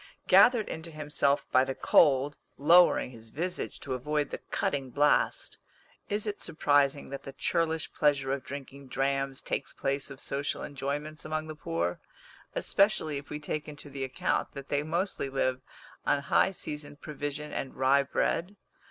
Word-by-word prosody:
Gathered 240 -4 +6
into 160 +1 -6
himself 150 -2 +1
by 130 - +6
the 135 0 -3
cold, 145 -1 +4 0.2
lowering 165 -2 +5
his 115 -2 -12
visage 175 +8 -4
to 135 - -4
avoid 145 +3 -1
the - - -4
cutting 135 -2 -1
blast, 145 +4 +1 0.5
is 205 +1 0
it 210 -1 -4
surprising 145 -3 +2
that 140 0 -6
the 135 - -9
churlish 160 +3 0
pleasure 140 -3 +2
of 140 - -3
drinking 140 0 -8
drams 135 0 -1
takes 140 - -3
place 140 +1 -1
of 135 -1 -10
social 140 +1 -2
enjoyments 145 +2 -4
amongst 155 0 -3
the 155 - -6
poor, 85 - -2 0.6
especially 195 -7 +2
if 140 +1 -8
we 150 - -4
take 150 0 -4
into 145 -1 -8
the 135 0 -4
account 130 -1 -1
that 140 -1 -8
they 145 - +1
mostly 165 -1 -2
live 130 -1 0 0.4
on 145 - +2
high 140 +6 +3
seasoned 150 -5 -6
provision 150 0 -5
and 135 - -4
rye 135 +2 +4
bread? 170 +7 -1
145 Hz, 160 wpm, -29 LUFS, 135-155 Hz, 0.6 s, Gathered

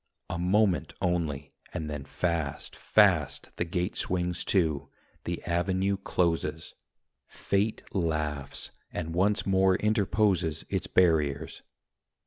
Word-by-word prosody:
A 85 - -3
moment 95 +1 +2
only, 75 -5 -1 0.2
and 80 - -3
then, 75 -2 -5
fast, 80 -2 -2
fast, 80 -10 +3
The 85 - 0
gate 90 +2 -2
swings 90 -1 -1
to, 80 -7 +1 0.4
the 85 0 -3
avenue 95 +3 +1
closes; 85 -4 -1 0.5
Fate 100 +3 -1
laughs, 75 -6 -2 0.2
and 80 0 -4
once 100 +4 +2
more 95 -1 +4
interposes 100 -5 +1
Its - - -1
barriers. 75 -6 +2
85 Hz, 110 wpm, -28 LUFS, 80-95 Hz, 0.5 s, more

